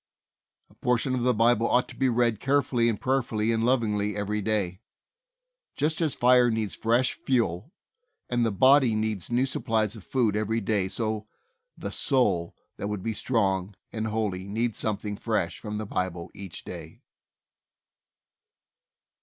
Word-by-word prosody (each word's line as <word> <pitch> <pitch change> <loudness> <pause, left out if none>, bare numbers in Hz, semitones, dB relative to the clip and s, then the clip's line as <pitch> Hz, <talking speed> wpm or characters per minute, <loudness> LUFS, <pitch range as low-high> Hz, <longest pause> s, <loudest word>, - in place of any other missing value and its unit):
A - - -20
portion 125 +2 0
of 130 - 0
the 125 +1 +3
Bible 115 +1 +3
ought 125 0 +3
to - - -11
be 135 -1 +1
read 120 -2 +1
carefully 135 -4 +2
and 110 - -2
prayerfully 120 -4 0
and 115 0 0
lovingly 105 -4 +1
every 105 +1 -2
day. 100 -3 -1 0.9
Just 155 +3 0
as 155 -4 +1
a - - -22
fire 125 0 +5
needs 110 -3 -1
fresh 120 +3 +1
fuel, 115 - -1 0.6
and 120 -1 +1
the 115 - +1
body 130 +2 +5
needs 110 -4 -2
new 120 +2 +2
supplies 110 -5 0
of 110 - -11
food 115 -4 +1
every 110 +2 0
day 100 -3 0
so 110 +1 -3 0.5
the - - -5
soul 100 - +1 0.2
that 100 - -3
would 105 -2 -4
be 115 - -1
strong 100 -5 0 0.2
and 110 -1 -2
holy 105 -4 -2
needs 115 +2 -1
something 105 -1 -2
fresh 100 -8 -1
from 105 -1 -5
the 110 - -4
Bible 90 -3 -3
each 95 -4 -8
day. - - -9
110 Hz, 155 wpm, -27 LUFS, 105-120 Hz, 0.9 s, fire